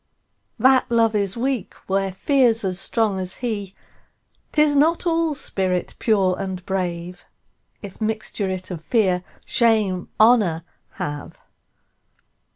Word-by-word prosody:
That 260 +2 +4
Love 230 -2 +3
is 200 0 0
weak 255 -2 -2
where 195 0 0
Fear's 230 +1 +2
as 185 -1 +1
strong 215 -2 +1
as 185 0 0
he;'Tis 240 +6 -3
not 320 +5 +3
all 330 -2 +1
spirit 185 -7 -1
pure 195 -5 +2
and 190 -2 -5
brave, 180 -2 -4 0.6
If 200 +2 -10
mixture 215 -2 -2
it 185 0 -4
of 165 -3 -6
Fear, 185 -6 +1 0.2
Shame, 215 -6 +1
Honour 215 -8 +4 0.3
have. 145 0 -6
200 Hz, 115 wpm, -22 LUFS, 185-235 Hz, 0.6 s, That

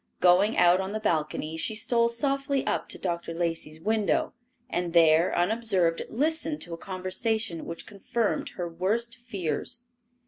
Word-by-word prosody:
Going 185 +5 +4
out 175 +2 +5
on 190 +1 -4
the 215 - -2
balcony, 160 -4 -1
she 215 +6 -2
stole 235 +1 +2
softly 275 +3 0
up - - -1
to - - -2
Dr. 170 -2 -3
Lacey's 165 -2 -2
window, 215 +3 +1 0.3
and 175 -8 -2
there, 165 0 +5
unobserved, 185 -3 +2
listened 310 +4 -1
to 170 - -6
a - - -4
conversation 185 +1 -2
which 170 - -7
confirmed 220 +2 -2
her 175 -2 -2
worst 205 +8 -1
fears. 235 +1 -3
190 Hz, 145 wpm, -27 LUFS, 170-230 Hz, 0.3 s, out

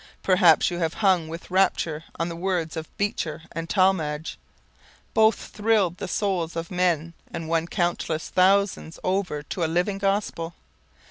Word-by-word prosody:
Perhaps 180 -4 +5
you 175 - -3
have 165 -1 -1
hung 185 -6 +2
with 165 +3 -8
rapture 165 -4 +1
on 165 - -1
the 170 - -5
words 175 -2 -2
of 160 -1 -5
Beecher 165 -6 -2
and 165 0 -5
Talmage. 165 -6 +1 0.7
Both 220 0 +5
thrilled 210 -5 +1
the - - -5
souls 180 -4 -1
of 165 +2 -4
men 170 -3 +1 0.2
and 165 - -5
won 165 0 0
countless 175 -3 -1
thousands 190 -3 +2
over 185 -6 -1
to 170 +4 -3
a - - +2
living 180 +4 0
gospel. 195 -4 -1
175 Hz, 150 wpm, -25 LUFS, 165-195 Hz, 0.7 s, Perhaps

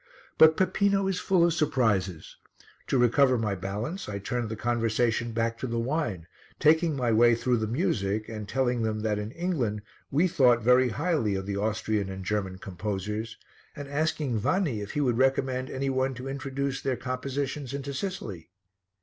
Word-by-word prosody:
But 160 0 +7
Peppino 195 +1 +2
is 190 -1 -1
full 180 -3 +3
of 170 - +2
surprises. 100 - 0 0.5
To - - +1
recover 125 +2 +4
my 110 -3 -1
balance 105 - -4
I 100 - -3
turned 120 +3 -3
the 110 - -3
conversation 115 0 0
back 115 0 -1
to 130 - -3
the 115 -1 -2
wine, 115 - -2 0.3
taking 160 +1 +4
my 125 -3 0
way 120 +1 +5
through 125 +1 +1
the 110 -1 -1
music 110 - -1
and 110 -2 -7
telling 125 -2 0
them 110 -1 -1
that 105 -1 0
in 105 +1 -4
England 130 - -2 0.3
we 160 +7 +3
thought 125 -8 +4
very 125 +2 +5
highly 145 - 0
of 95 0 -3
the 100 0 -3
Austrian 105 -1 -1
and 95 -1 -7
German 95 -2 -2
composers, 105 +4 -4 0.4
and 145 -1 -7
asking 145 -4 -1
Vanni 140 - 0
if 100 - -6
he 150 - 0
would 125 -4 +1
recommend 130 -1 +1
any 135 +1 -2
one 130 0 0
to 125 +2 -7
introduce 135 0 -3
their 130 -2 -1
compositions 135 +1 -3
into 140 0 -4
Sicily. 125 - -5
125 Hz, 175 wpm, -27 LUFS, 110-140 Hz, 0.5 s, But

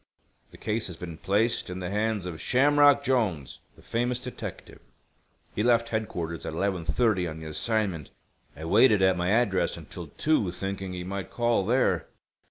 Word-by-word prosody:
The - - -15
case 110 +1 -2
has 90 -3 -8
been 85 -2 -8
placed 110 +3 +1
in 90 - -5
the 90 0 -4
hands 105 -1 -1
of 85 -3 -6
Shamrock 145 +2 +4
Jolnes, 110 - 0 0.2
the - - -19
famous 120 +1 -1
detective. 125 0 -8 0.7
He - - -1
left 115 0 +3
Headquarters 85 -7 -3
at - - -4
11:30 95 +1 0
on 80 0 -7
the 80 - -9
assignment. 90 0 -2 0.5
I 80 - -7
waited 105 +3 +5
at 95 -1 +4
my 90 0 -1
address 105 -3 +2
until - - -9
two, 155 - +1
thinking 95 +1 -4
he 90 -1 -5
might 95 +1 -5
call 120 -4 +1
there." 125 +3 +2
100 Hz, 165 wpm, -27 LUFS, 90-120 Hz, 0.7 s, waited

